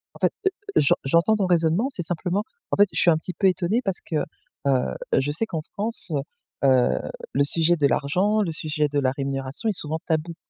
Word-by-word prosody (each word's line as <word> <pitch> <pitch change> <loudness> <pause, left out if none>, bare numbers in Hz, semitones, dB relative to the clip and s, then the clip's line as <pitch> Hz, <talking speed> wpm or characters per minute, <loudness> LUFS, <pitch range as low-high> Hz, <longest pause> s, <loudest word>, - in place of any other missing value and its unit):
En - - -14
fait, - - +2 0.2
heu, - - +3 0.3
j'en 140 - +5
j'entends 170 +10 +3
ton 200 - 0
raisonnement, 175 +6 +2
c'est 260 - -5
simplement 180 +4 -2 0.3
en - - 0
fait, 205 0 +6
je - - +5
suis 175 - +6
un 155 - +3
petit 180 +3 -6
peu 195 - +2
étonné 190 +6 +1
parce 195 -4 -2
que, 165 - -6 0.5
heu, 125 - +1 0.2
je 145 +2 +1
sais 165 +10 +1
qu'en 165 -8 -4
France, 210 -4 -1 0.5
heu, 130 -2 +3 0.3
le 140 +2 +3
sujet 165 +3 +3
de 150 -4 +1
l'argent, 190 +11 +1
le 175 - -1
sujet 155 -1 0
de 145 0 0
la 130 -2 +1
rémunération 135 +6 -4
est 210 - 0
souvent 155 +2 -1
tabou. 165 +1 -1
165 Hz, 210 wpm, -24 LUFS, 145-190 Hz, 0.5 s, fait